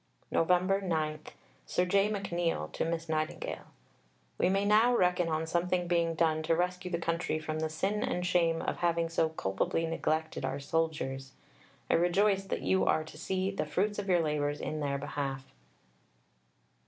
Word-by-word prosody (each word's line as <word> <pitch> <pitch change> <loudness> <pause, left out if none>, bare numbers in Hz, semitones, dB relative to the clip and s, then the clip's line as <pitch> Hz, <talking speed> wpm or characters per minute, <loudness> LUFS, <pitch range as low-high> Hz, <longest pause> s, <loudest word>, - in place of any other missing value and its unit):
Nov. 165 - +1
9 180 -4 +1 0.5
(Sir 180 - +1
J. 195 +3 +3
McNeill 175 - -1
to - - -2
Miss 165 0 -2
Nightingale). 155 -1 -3 0.7
We 180 - +3
may 195 +1 +1
now 220 +4 +5
reckon 180 -1 +2
on 160 0 0
something 175 +2 0
being 170 -1 +1
done 155 -1 +2
to 165 +1 +1
rescue 180 +1 -1
the 170 - -1
country 165 -1 -1
from 155 0 -4
the 160 0 -1
sin 195 +7 -1
and 180 0 -1
shame 170 -2 +2
of - - -2
having 170 -1 +1
so 165 -1 +1
culpably 160 +4 -1
neglected 160 -1 -1
our 135 +1 -2
soldiers. 140 -3 -2 0.5
I - - +1
rejoice 195 +3 +3
that - - -3
you 190 - +2
are 155 - +2
to 155 - -12
see 190 +4 -1
the 195 - -3
fruits 205 +7 0
of 200 -1 -4
your 175 -2 +4
labours 145 -1 -1
in 155 - -3
their 140 -2 -1
behalf. 140 -1 -4
165 Hz, 165 wpm, -31 LUFS, 155-180 Hz, 0.7 s, now